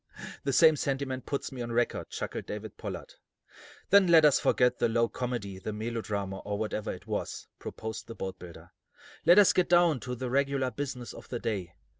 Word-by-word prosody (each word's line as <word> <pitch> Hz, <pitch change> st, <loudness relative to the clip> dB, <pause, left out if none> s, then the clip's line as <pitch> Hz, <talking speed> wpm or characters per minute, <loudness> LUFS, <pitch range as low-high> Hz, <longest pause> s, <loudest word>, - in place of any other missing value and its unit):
"The 140 Hz, -, 0 dB
same 160 Hz, +3 st, +6 dB
sentiment 135 Hz, -2 st, -2 dB
puts 140 Hz, -, -3 dB
me 130 Hz, -2 st, -6 dB
on 120 Hz, 0 st, -4 dB
record," 120 Hz, 0 st, 0 dB
chuckled -, -, -5 dB
David 105 Hz, 0 st, -6 dB
Pollard: -, -, -7 dB, 0.8 s
"Then 200 Hz, -1 st, +7 dB
let 165 Hz, -2 st, +7 dB
us 145 Hz, -, +5 dB
forget 125 Hz, -1 st, +2 dB
the -, -, +2 dB
low 115 Hz, +1 st, +2 dB
comedy, 115 Hz, -7 st, -4 dB
the 110 Hz, -, -4 dB
melodrama, 105 Hz, -3 st, -3 dB
or 105 Hz, 0 st, -4 dB
whatever 110 Hz, 0 st, -2 dB
it 95 Hz, +2 st, -9 dB
was," 105 Hz, -1 st, -4 dB
proposed 110 Hz, -1 st, -6 dB
the 115 Hz, -, -8 dB
boatbuilder. 90 Hz, -4 st, -8 dB, 0.6 s
"Let 175 Hz, +3 st, +8 dB
us 205 Hz, -2 st, +7 dB
get 180 Hz, -, +2 dB
down 175 Hz, -5 st, +4 dB
to 125 Hz, 0 st, -5 dB
the 125 Hz, 0 st, -4 dB
regular 135 Hz, -1 st, +1 dB
business 125 Hz, -2 st, -5 dB
of -, -, -12 dB
the 125 Hz, -, -3 dB
day. 95 Hz, -7 st, -3 dB
120 Hz, 185 wpm, -29 LUFS, 105-140 Hz, 0.8 s, Let